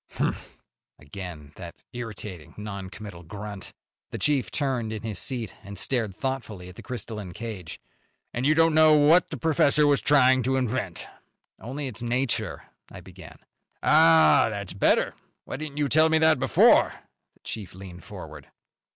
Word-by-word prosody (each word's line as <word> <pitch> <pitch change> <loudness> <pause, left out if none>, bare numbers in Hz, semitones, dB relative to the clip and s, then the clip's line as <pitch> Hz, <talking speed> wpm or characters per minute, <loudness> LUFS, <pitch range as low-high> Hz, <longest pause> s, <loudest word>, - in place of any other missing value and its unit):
"Humph!" - - -3 0.4
Again 75 -1 -9
that 85 -2 -10
irritating, 105 -8 -8
non 100 -2 -6
committal 100 -4 -10
grunt. 100 +2 -8 0.4
The - - -5
chief 145 -4 +1
turned 130 -6 -2
in 110 0 -6
his 110 -3 -4
seat 120 -6 -4
and 100 +1 -10
stared 115 -7 -1
thoughtfully 115 -9 -5
at 90 - -13
the - - -10
crystalline 105 -6 -6
cage. 105 -6 -7 0.5
"And 125 +3 0
you 155 - +4
don't 165 0 +4
know 155 0 +6
what 155 +4 +5
the - - -5
professor 150 -2 +3
was 145 -1 +3
trying 130 -3 +4
to 130 +2 0
invent?" 120 -8 -2 0.5
"Only 140 +5 -5
its 125 -3 -3
nature," 120 +1 -1 0.3
I - - -11
began. - - -13 0.5
"Ah! 80 -2 +6
That's - - -5
better. - - +2 0.3
Why - - -5
didn't 150 -1 -7
you 145 -1 +1
tell 155 +4 +4
me 160 - +4
that 160 -3 +4
before?" 130 - +5 0.4
The - - -32
chief 105 -5 -7
leaned 90 -3 -11
forward. - - -10
115 Hz, 160 wpm, -26 LUFS, 95-140 Hz, 0.5 s, know